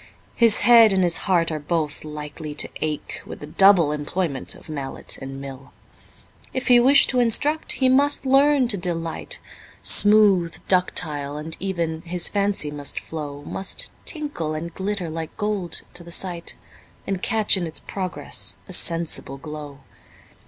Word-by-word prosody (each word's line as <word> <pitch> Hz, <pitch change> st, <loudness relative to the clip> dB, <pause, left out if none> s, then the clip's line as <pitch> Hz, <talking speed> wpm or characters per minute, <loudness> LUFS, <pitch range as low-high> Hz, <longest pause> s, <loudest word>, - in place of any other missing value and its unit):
His 230 Hz, -2 st, +4 dB
head 230 Hz, -3 st, +7 dB
and 190 Hz, -1 st, +2 dB
his 175 Hz, -1 st, +3 dB
heart 170 Hz, -3 st, +2 dB
are 155 Hz, -, -3 dB
both 150 Hz, 0 st, -2 dB
likely 150 Hz, 0 st, -7 dB
to -, -, -4 dB
ache 155 Hz, -1 st, -4 dB
With -, -, -10 dB
the -, -, -8 dB
double 175 Hz, 0 st, +4 dB
employment 150 Hz, -1 st, -3 dB
of -, -, -16 dB
mallet 140 Hz, -4 st, -5 dB
and 135 Hz, 0 st, -7 dB
mill. 135 Hz, -1 st, -10 dB, 0.8 s
If 260 Hz, -, -2 dB
he 245 Hz, -1 st, +7 dB
wish 270 Hz, +4 st, +6 dB
to 255 Hz, -, +1 dB
instruct, 285 Hz, +7 st, +2 dB
he 260 Hz, -, +1 dB
must 280 Hz, +2 st, +3 dB
learn 275 Hz, 0 st, +4 dB
to 205 Hz, -, +1 dB
delight, 165 Hz, -2 st, -4 dB, 0.5 s
Smooth, 205 Hz, -5 st, +4 dB
ductile, 150 Hz, -6 st, -1 dB
and 160 Hz, +2 st, -5 dB
even, 170 Hz, -4 st, -3 dB
his 175 Hz, +1 st, +2 dB
fancy 200 Hz, -7 st, +1 dB
must 145 Hz, -1 st, -1 dB
flow, 145 Hz, -3 st, -7 dB
Must 195 Hz, -, -2 dB
tinkle 290 Hz, -, -1 dB
and 165 Hz, +2 st, -6 dB
glitter 195 Hz, -2 st, -3 dB
like 160 Hz, 0 st, -6 dB
gold 205 Hz, -5 st, -3 dB
to 175 Hz, -, -6 dB
the 170 Hz, -, -12 dB
sight, 175 Hz, -1 st, 0 dB, 0.5 s
And 195 Hz, -2 st, -3 dB
catch 220 Hz, 0 st, +2 dB
in 180 Hz, -3 st, -2 dB
its 160 Hz, -, -7 dB
progress 185 Hz, -2 st, -2 dB
a -, -, -8 dB
sensible 165 Hz, -5 st, +3 dB
glow. 150 Hz, -1 st, -9 dB
170 Hz, 155 wpm, -22 LUFS, 150-205 Hz, 0.8 s, head